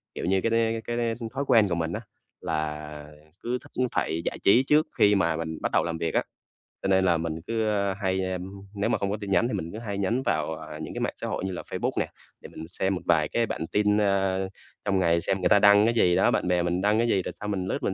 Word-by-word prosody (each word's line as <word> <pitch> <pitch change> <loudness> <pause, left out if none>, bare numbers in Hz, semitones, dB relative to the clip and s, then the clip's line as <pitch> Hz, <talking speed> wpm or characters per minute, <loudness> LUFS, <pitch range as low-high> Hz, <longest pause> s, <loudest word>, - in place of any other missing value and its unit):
kiểu - - -4
như, 95 +2 +2
cái 115 - +1
đ 115 - +1 0.3
cái 120 - -3 0.2
đ - - -8 0.2
thói 135 +1 -1
quen 115 -5 +5
của 85 - 0
mình 80 0 -2
á. 110 - -3 0.4
Là 75 -1 -4 0.4
cứ 125 +1 -1
thích 125 - -2
phải 80 - -1
giải - - -2
trí 115 +6 +6
trước 150 +1 +4
khi 105 0 +5
mà 85 -4 +2
mình 80 0 -4
bắt - - -1
đầu - - +3
làm 85 -1 -3
việc 80 -1 -2
á. - - +3
v - - -8 0.6
Cho - - 0
nên 95 -1 +3
là 85 -2 +3
mình 80 0 -4
cứ, 115 -1 0
ơ, 100 -2 +1
hay, 95 -1 0
ưm, 90 +1 -5 0.2
nếu 100 - 0
mà - - +2
không 100 0 -2
có 105 - -1
tin 100 -1 -5
nhắn 95 +5 +3
thì 125 - -4
mình 85 -5 -3
cứ 110 - -6
hay 105 -4 -4
nhấn 110 +6 0
vào, 80 -4 0
ờ, 80 -1 -9
những 80 - -6
cái - - -4
mạng - - -1
xã - - -5
hội - - -3
như 95 - -2
là 90 - -5
Facebook - - -3
nè, - - 0 0.3
để - - -10
mình 80 - -9
xem 95 0 +1
một 90 - -5
vài 80 -3 +3
cái 115 +7 0
bản 80 -6 -4
tin, 105 0 +2
ơ, 95 -2 +1 0.4
trong 100 -2 +1
ngày 85 -2 +2
xem 95 +3 0
người - - +2
ta 100 - +6
đăng 100 +1 +6
cái 115 - +2
gì 90 -6 +3
đó, 95 - +4
bạn - - 0
bè 90 -1 +2
mình 90 +1 0
đăng 105 +2 +3
cái 120 - +2
gì? 100 -5 +2
Rồi - - -4
xong 105 0 -5
mình 95 -2 -2
lướt - - -3
mình - - 0
95 Hz, 290 wpm, -26 LUFS, 85-105 Hz, 0.6 s, trí